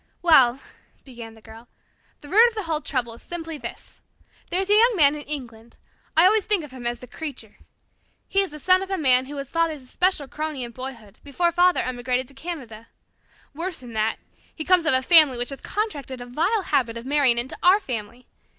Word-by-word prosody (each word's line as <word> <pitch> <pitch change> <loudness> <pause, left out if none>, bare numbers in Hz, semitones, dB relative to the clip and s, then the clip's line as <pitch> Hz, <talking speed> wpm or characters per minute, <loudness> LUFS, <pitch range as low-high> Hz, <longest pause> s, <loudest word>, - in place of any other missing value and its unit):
"Well," 270 -7 +5 0.5
began 235 -4 -11
the 220 - -19
Girl, 225 +2 -14 0.5
"the 295 - -13
root 440 +9 +6
of 470 - -5
the 425 - -3
whole 320 -3 -2
trouble 245 -6 -3
is 230 - -15
simply 330 -3 -6
this. - - -10 0.5
There 360 - -1
is 385 - -2
a - - +6
young 470 +3 +5
man 290 -5 +5
in 300 - -6
England. 240 -6 -8 0.4
I 330 - +7
always 420 +1 +3
think 415 -6 +1
of 295 - -11
him 250 -2 -6
as 240 0 -4
the - - -9
Creature. 250 -4 -9 0.7
He 395 - +2
is 390 - -2
the 300 - -10
son 370 +5 +3
of 385 - -6
a 385 - -1
man 260 -4 +3
who 290 - -8
was 275 -1 -7
Father's 330 -4 -1
especial 310 +2 -1
crony 305 -2 -5
in 240 - -7
boyhood, 235 -5 -10
before 340 +5 0
Father 355 +1 +3
emigrated 250 0 -2
to - - -17
Canada. 265 -8 -8 0.7
Worse 340 +4 -4
than 240 -2 -11
that, 220 0 -1 0.4
he 315 - -6
comes 360 -3 +3
of 315 - +4
a 260 - +2
family 305 -4 +6
which 245 0 -3
has 275 - -9
contracted 290 - -4
a 245 - -8
vile 340 - -1
habit 250 -8 0
of 230 - -9
marrying 275 -3 +3
into 240 +3 -2
our 370 +3 +5
family. 240 - -7
280 Hz, 215 wpm, -23 LUFS, 245-345 Hz, 0.7 s, I